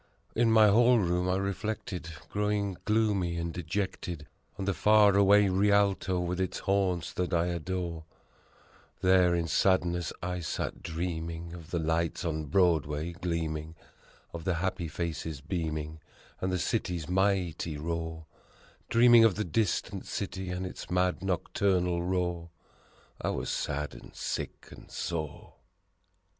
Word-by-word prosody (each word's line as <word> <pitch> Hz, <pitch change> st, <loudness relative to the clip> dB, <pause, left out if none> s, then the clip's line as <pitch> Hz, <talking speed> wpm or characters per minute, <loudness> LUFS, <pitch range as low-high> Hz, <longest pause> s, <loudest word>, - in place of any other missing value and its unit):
In 115 Hz, 0 st, +3 dB
my 110 Hz, -1 st, +7 dB
hall 120 Hz, +4 st, +6 dB
room 90 Hz, -2 st, +1 dB
I 90 Hz, -, +2 dB
reflected, 100 Hz, -3 st, -3 dB, 0.2 s
growing 105 Hz, -1 st, -1 dB
gloomy 105 Hz, -6 st, +1 dB
and 85 Hz, 0 st, -3 dB
dejected, 90 Hz, -2 st, -3 dB, 0.3 s
On 95 Hz, -, -3 dB
the 100 Hz, -, +1 dB
far 105 Hz, 0 st, +5 dB
away 100 Hz, +1 st, +6 dB
Rialto 100 Hz, -1 st, +2 dB
with 90 Hz, +1 st, -1 dB
its 95 Hz, -, -2 dB
haunts 95 Hz, -3 st, 0 dB
that 90 Hz, 0 st, -2 dB
I 85 Hz, 0 st, +2 dB
adore; 85 Hz, -1 st, -3 dB, 1.0 s
There 90 Hz, -1 st, +5 dB
in 85 Hz, -1 st, 0 dB
sadness 90 Hz, 0 st, +2 dB
I 90 Hz, 0 st, -2 dB
sat 80 Hz, -, -3 dB
dreaming 85 Hz, 0 st, -4 dB
of 85 Hz, -2 st, -10 dB
the 85 Hz, -, -1 dB
lights 80 Hz, +1 st, 0 dB
on 80 Hz, -2 st, -2 dB
Broadway 80 Hz, -1 st, +2 dB
gleaming, 80 Hz, -3 st, -3 dB, 0.6 s
Of 85 Hz, -1 st, -6 dB
the 90 Hz, 0 st, 0 dB
happy 90 Hz, 0 st, -2 dB
faces 80 Hz, -2 st, -4 dB
beaming, 80 Hz, -1 st, -3 dB, 0.4 s
and 95 Hz, -, -1 dB
the 90 Hz, -, +1 dB
city's 90 Hz, -4 st, -1 dB
mighty 90 Hz, -4 st, 0 dB
roar: 80 Hz, +1 st, -4 dB, 0.6 s
Dreaming 120 Hz, 0 st, +7 dB
of 110 Hz, -5 st, +5 dB
the 105 Hz, -, -1 dB
distant 100 Hz, +3 st, -1 dB
city 95 Hz, -2 st, -4 dB
and 90 Hz, +1 st, -3 dB
its 90 Hz, -, -7 dB
mad 90 Hz, 0 st, +1 dB
nocturnal 90 Hz, -1 st, +1 dB
roar 90 Hz, -1 st, -1 dB, 0.7 s
I -, -, -1 dB
was -, -, -2 dB
sad 75 Hz, +1 st, -2 dB
and -, -, -13 dB
sick -, -, -4 dB
and -, -, -13 dB
sore! 80 Hz, -4 st, -4 dB
90 Hz, 135 wpm, -30 LUFS, 85-95 Hz, 1.0 s, my